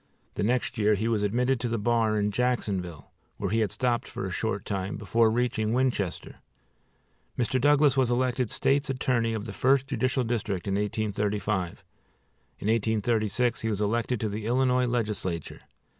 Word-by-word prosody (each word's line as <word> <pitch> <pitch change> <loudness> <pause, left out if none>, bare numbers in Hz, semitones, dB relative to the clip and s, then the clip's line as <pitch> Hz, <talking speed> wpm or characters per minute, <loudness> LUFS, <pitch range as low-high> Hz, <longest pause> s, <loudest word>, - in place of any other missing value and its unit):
The - - -4
next 120 +2 0
year 105 0 +4
he 110 +3 -1
was 115 -3 +1
admitted 125 +5 +1
to 120 - -2
the 115 0 -1
bar 110 0 +1
in 105 0 0
Jacksonville, 100 -9 -2 0.3
where 100 -2 -2
he 115 - +2
had 110 -2 +1
stopped 120 +3 -1
for - - -5
a - - -4
short - - -2
time, 95 -1 -3
before 110 +2 +2
reaching 110 -2 0
Winchester. 120 -8 -1 1.0
Mr. 125 +1 0
Douglas 145 0 +4
was 130 -3 +2
elected 125 -1 0
State's 140 +1 +1
Attorney 125 -3 0
of 110 -1 -4
the 105 - -6
First 135 +3 +3
Judicial 130 -1 0
District 105 -6 -2
in 100 - 0
1835. 105 -2 -1 0.7
In - - -5
1836 110 +1 +1
he 110 - -1
was 105 -2 -1
elected 115 +3 0
to 110 - 0
the 105 +1 -4
Illinois 125 0 +2
legislature. 105 -8 -2
115 Hz, 165 wpm, -27 LUFS, 105-125 Hz, 1.0 s, year